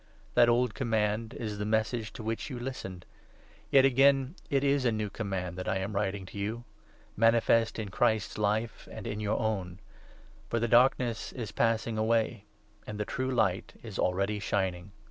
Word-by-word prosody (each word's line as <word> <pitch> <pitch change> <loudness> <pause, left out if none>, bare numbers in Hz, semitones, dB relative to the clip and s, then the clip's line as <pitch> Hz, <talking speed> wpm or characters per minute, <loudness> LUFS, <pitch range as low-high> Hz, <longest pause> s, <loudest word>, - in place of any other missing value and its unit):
That 120 - +6
old 120 -1 +2
command 110 0 -1
is 105 -5 -4
the - - -1
Message 110 +1 0
to 115 - -8
which 115 +5 -3
you 130 - -5
listened. 110 -8 -6 0.6
Yet, 135 -1 +6
again, 135 +1 +4 0.2
it 140 -3 +2
is 140 -1 +2
a 120 - +3
new 105 -2 -2
Command 95 -4 -4
that 90 - -3
I 95 - +1
am 95 +2 -3
writing 100 -1 -1
to 100 - -8
you 110 +4 -3 0.3
— 105 - -30
8 - - -31
manifest 115 0 +3
in 110 -3 -4
Christ's 110 0 +1
life 105 +2 -1
and - - -8
in 105 - -3
your 105 0 0
own 95 -5 -2 0.4
— - - -25
for 115 - 0
the 120 - +1
Darkness 120 -1 +3
is 115 -5 -5
passing 115 0 0
away 110 -1 +1 0.4
and 105 -1 -6
the 105 - -1
true 130 +4 -2
Light 95 -7 0
is 110 -4 -7
already 100 +3 +1
shining. 95 -2 -2
110 Hz, 185 wpm, -30 LUFS, 100-120 Hz, 0.6 s, That